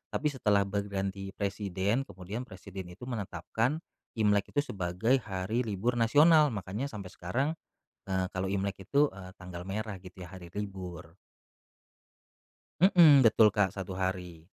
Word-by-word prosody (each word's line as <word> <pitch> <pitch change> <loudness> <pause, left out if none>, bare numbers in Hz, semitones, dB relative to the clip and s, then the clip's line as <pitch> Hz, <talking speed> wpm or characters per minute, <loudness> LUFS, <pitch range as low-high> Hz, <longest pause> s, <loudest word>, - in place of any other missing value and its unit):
tapi 150 -1 +1
setelah 105 -7 +2
berganti 100 0 -3
presiden 100 +4 -1
kemudian 100 +8 -7
presiden 95 0 -9
itu 90 +7 -12
menetapkan 120 - -2 0.3
Imlek 105 -2 +2
itu 145 - +3
sebagai 95 +7 +1
hari 95 +4 -2
libur 115 +5 -1
nasional 150 +7 +6
makanya 105 +7 -3
sampai 100 -7 -8
sekarang, 120 +11 -1 0.6
eee, 95 -1 +1
kalau 95 0 -1
Imlek 100 0 -2
itu, 145 +8 +3
eee, 95 -1 -9
tanggal 90 -1 -8
merah 100 +2 -4
gitu 95 0 -13
ya - - -12
hari 90 -2 -10
libur. 90 -5 -6 1.7
Mhm, 170 -7 +8
betul 110 -1 +6
Kak 100 -3 +3
1 95 -1 -5
hari. 90 -3 -4
100 Hz, 135 wpm, -30 LUFS, 95-115 Hz, 1.7 s, Mhm